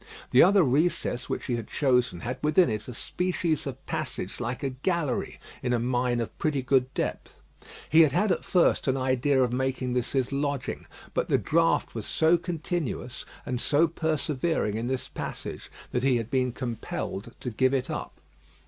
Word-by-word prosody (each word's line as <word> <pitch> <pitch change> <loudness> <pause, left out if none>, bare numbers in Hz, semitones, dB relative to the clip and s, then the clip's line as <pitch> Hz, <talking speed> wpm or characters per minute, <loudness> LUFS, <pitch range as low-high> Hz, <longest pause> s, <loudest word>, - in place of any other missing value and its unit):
The 125 - +7
other 195 +1 +6
recess 135 -3 +1
which - - -3
he 120 - -1
had 115 - -6
chosen 125 - +1
had 125 +2 -4
within 155 -1 +4
it 105 0 -4
a 125 - -6
species 170 -1 -1
of 135 0 -7
passage - - -4
like 120 +2 -3
a 135 - 0
gallery 145 0 -1 0.2
in 125 -1 0
a 120 - +2
mine 125 0 +1
of 115 - -4
pretty 145 -5 0
good 130 0 +2
depth. - - -3 0.5
He 160 +2 +6
had 155 -3 +5
had 205 +8 +2
at - - 0
first 175 -4 +2
an 130 0 +2
idea 130 +1 +2
of 125 -1 0
making 130 0 -1
this 125 +1 -1
his 130 -1 +1
lodging, 140 -1 -2 0.3
but - - -1
the - - +4
draught 165 +1 +2
was 110 -3 -5
so 160 +2 +4
continuous 160 - -3 0.2
and 125 -1 -2
so 155 +3 +4
persevering 155 -6 -1
in 115 +2 -2
this 130 0 -2
passage - - -6 0.2
that 125 - 0
he 130 -1 +3
had 115 0 -4
been 130 -1 +1
compelled 115 -3 -5
to 125 - -4
give 130 +4 +2
it 130 -2 0
up. - - -5
130 Hz, 185 wpm, -27 LUFS, 125-155 Hz, 0.5 s, The